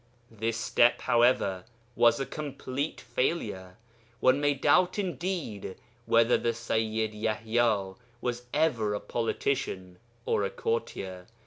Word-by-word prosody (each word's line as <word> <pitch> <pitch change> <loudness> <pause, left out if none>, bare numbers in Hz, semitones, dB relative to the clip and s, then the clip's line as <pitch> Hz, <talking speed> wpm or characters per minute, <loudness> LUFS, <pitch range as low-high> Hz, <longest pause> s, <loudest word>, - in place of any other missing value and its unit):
This 115 +1 -2
step, 120 +2 +3
however, 120 -6 +2 0.3
was 120 +4 +4
a 135 - -1
complete 140 -1 -4
failure. 110 - -2 0.4
One 130 +4 +4
may 145 0 +2
doubt 180 +7 +3
indeed 175 - -3 0.3
whether 115 +1 +4
the 115 -1 0
Sayyid 110 -1 -1
Yaḥya 110 -2 0 0.2
was 120 0 -3
ever 120 -9 +1
a - - -2
politician 95 -6 -2 0.3
or - - +1
a 100 - 0
courtier. 95 -5 -3
115 Hz, 115 wpm, -29 LUFS, 105-130 Hz, 0.4 s, was